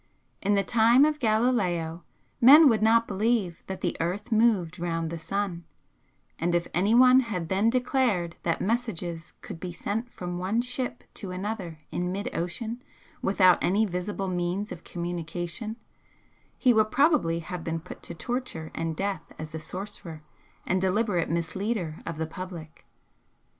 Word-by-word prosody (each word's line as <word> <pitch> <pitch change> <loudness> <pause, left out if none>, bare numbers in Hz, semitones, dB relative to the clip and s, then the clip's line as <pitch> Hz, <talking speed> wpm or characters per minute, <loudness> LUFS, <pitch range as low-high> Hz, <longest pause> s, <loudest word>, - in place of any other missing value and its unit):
In 205 +1 +2
the 200 - +2
time 235 +6 +5
of 305 0 0
Galileo 205 - +1 0.4
men 290 +6 +10
would 225 -5 +3
not 230 +1 +4
believe 205 -3 0
that 190 - -5
the 175 - -1
earth 195 +8 -3
moved 215 -8 +2
round 165 -1 -2
the 170 - -4
sun, 185 0 -3 0.8
and 175 +1 +1
if 170 0 0
anyone 240 +8 +6
had 195 -10 -3
then 200 +4 +3
declared 245 -8 +1
that 165 -1 0
messages 180 -7 -2
could - - -8
be 180 0 -5
sent 215 +7 -3
from 175 -1 -5
one 195 +5 0
ship 250 0 -3
to 195 - -7
another 185 -3 -4
in 180 0 -2
mid 200 +2 -4
ocean 225 +8 -3 0.4
without 185 -2 +4
any 205 +5 +3
visible 195 +1 -3
means 180 +3 -2
of 170 - -8
communication, 175 +4 -4 0.8
he 250 -3 +4
would 215 -1 +3
probably 275 - +3
have 170 +1 -6
been 165 0 -2
put 170 - -11
to 170 - -8
torture 240 -5 -4
and 165 -1 -2
death 195 +3 -3
as 155 0 -7
a 160 - -4
sorcerer 170 -2 -7 0.4
and 185 0 +1
deliberate 190 -2 +1
misleader 170 +1 -2
of 165 -2 -4
the 160 - -1
public. 170 -2 -9
190 Hz, 155 wpm, -27 LUFS, 170-225 Hz, 0.8 s, men